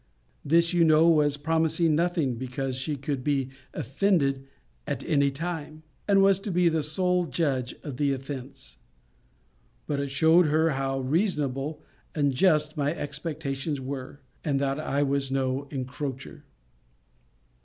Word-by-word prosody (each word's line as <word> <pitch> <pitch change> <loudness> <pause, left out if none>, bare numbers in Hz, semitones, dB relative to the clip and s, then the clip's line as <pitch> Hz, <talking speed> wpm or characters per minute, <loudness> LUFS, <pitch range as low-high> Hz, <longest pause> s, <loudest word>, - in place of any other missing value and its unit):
This, 170 +3 +3
you 175 -1 +4
know, 160 0 +5
was 150 -3 +4
promising 160 +2 +1
nothing, 165 -4 +1
because 130 +2 -4
she 145 +4 -2
could 140 -1 -4
be 135 -2 0 0.2
offended 140 - 0 0.4
at - - -3
any 140 -4 +2
time, 155 +1 -5 0.2
and 195 -1 +5
was 195 -1 +4
to 205 +1 -5
be 175 -1 +3
the 160 -1 0
sole 180 +3 +1
judge 135 -8 -1
of 140 -5 -6
the 145 0 +1
offence. 135 - -7 1.1
But 145 - -2
it 140 0 -2
shewed 160 +5 +4
her 160 +2 +2
how 135 -1 -1
reasonable 150 -1 -1 0.3
and 145 -3 +2
just 150 +1 +2
my 145 +2 0
expectations 145 -1 -4
were; 135 +1 -6 0.2
and 140 -4 0
that 135 +1 -1
I 145 -2 0
was 140 -1 0
no 135 +1 -1
encroacher. 130 - -6
145 Hz, 140 wpm, -27 LUFS, 135-160 Hz, 1.1 s, know